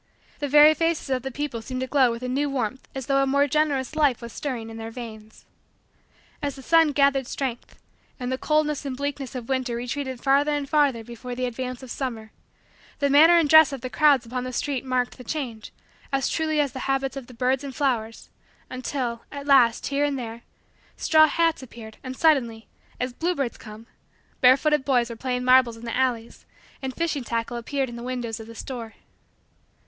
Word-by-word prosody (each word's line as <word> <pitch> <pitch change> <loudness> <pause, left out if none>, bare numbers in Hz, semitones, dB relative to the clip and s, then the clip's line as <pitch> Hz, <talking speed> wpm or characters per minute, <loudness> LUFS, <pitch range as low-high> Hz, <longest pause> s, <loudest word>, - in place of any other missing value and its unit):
The 290 - -2
very 300 +2 +7
faces 330 -2 -1
of 255 -1 +1
the 265 - -4
people 265 -3 -4
seemed 255 +3 -5
to - - 0
glow 260 -1 +3
with 230 +1 -5
a - - -2
new 280 +3 0
warmth 260 -2 -3
as 265 -2 -4
though 275 +1 +2
a 275 - +1
more 280 +1 +3
generous 290 -1 0
life 290 -6 +2
was 235 -1 -9
stirring 240 -6 -4
in 225 - -9
their 225 0 -6
veins. 220 -2 -10 1.0
As 285 -2 -2
the 270 - -11
sun 325 +1 +4
gathered 275 -2 +2
strength, 255 -4 -5 0.4
and 250 0 -3
the 260 - -1
coldness 305 -1 +1
and 270 -3 -5
bleakness 280 -2 -4
of 245 -2 -6
winter 260 -3 -1
retreated 255 +2 -4
farther 280 +3 +2
and 290 -1 -2
farther 280 -6 +2
before 240 +2 -8
the 255 +1 -2
advance 250 +1 -5
of 255 - -9
summer, 225 -5 -5 0.7
the 280 -1 +1
manner 320 +5 +7
and 330 -3 +3
dress 315 0 +7
of 275 -3 -6
the 255 - -5
crowds 285 -5 +4
upon 250 +2 -4
the 255 - -5
streets 270 0 -2
marked 255 0 -1
the - - -8
change 240 -5 -5 0.4
as 270 -2 +1
truly 315 -1 0
as 285 -3 +1
the 260 +2 -6
habits 270 0 0
of 270 -3 -7
the 255 - -13
birds 255 +3 0
and 275 -2 -7
flowers, 235 -6 -2 0.4
until, 255 -2 -3
at 280 -1 -7
last, 260 -5 +4
here 280 +1 0
and 285 -1 0
there, 230 -2 -6 0.6
straw 310 -1 +5
hats 330 0 +1
appeared 225 -3 -11
and 260 -1 -6
suddenly, 240 -8 +2 0.3
as 250 0 -2
bluebirds 300 -5 -2
come, 215 0 -11 0.5
barefooted 275 +3 +4
boys 245 -3 +1
were - - -6
playing 250 +1 -3
marbles 255 -2 +5
in 230 - -10
the 230 - -3
alleys 245 -3 -1 0.4
and 265 -1 -4
fishing 320 -5 -1
tackle 230 0 -3
appeared 270 +3 -2
in 240 -1 -8
the - - -7
windows 240 -2 -4
of 225 - -9
the 230 - -11
stores. 230 -2 -7
260 Hz, 200 wpm, -24 LUFS, 240-285 Hz, 1.0 s, very